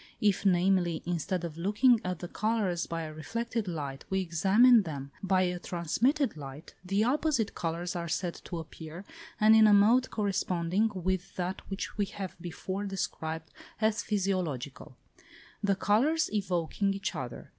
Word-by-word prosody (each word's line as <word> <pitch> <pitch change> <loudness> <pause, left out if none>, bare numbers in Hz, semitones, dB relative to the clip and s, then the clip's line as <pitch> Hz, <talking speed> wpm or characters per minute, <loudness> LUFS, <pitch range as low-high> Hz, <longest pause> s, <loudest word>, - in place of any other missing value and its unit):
If, 205 -1 +2
namely, 180 -2 +2
instead 175 +1 -2
of 165 -2 -5
looking 215 +6 +4
at 180 0 -2
the 175 - -6
colours 205 -4 -1
by 165 -1 -3
a 155 -1 -6
reflected 230 +7 -3
light, 145 -5 -4
we 190 - +1
examine 195 +8 +5
them 140 -6 -6
by 190 -1 +2
a 180 -1 -1
transmitted 230 - 0
light, 140 0 -9
the 195 +3 +1
opposite 260 -3 +1
colours 170 +2 -3
are 170 -1 -3
said 175 +1 -1
to 175 - -5
appear, 160 +2 -8 0.3
and 215 +1 +7
in 220 -1 +7
a 210 - +6
mode 230 +6 +5
corresponding 190 -1 0
with 185 +1 -2
that 185 +1 -3
which 195 +2 -5
we 205 - +3
have 195 -1 -6
before 185 +3 -4
described 160 -5 -4 0.3
as 220 +1 +2
physiological; 170 - -2 0.6
the 200 -1 +2
colours 255 +12 +2
evoking 195 0 0
each 195 0 -3
other. 125 -2 -6
185 Hz, 155 wpm, -30 LUFS, 170-210 Hz, 0.6 s, and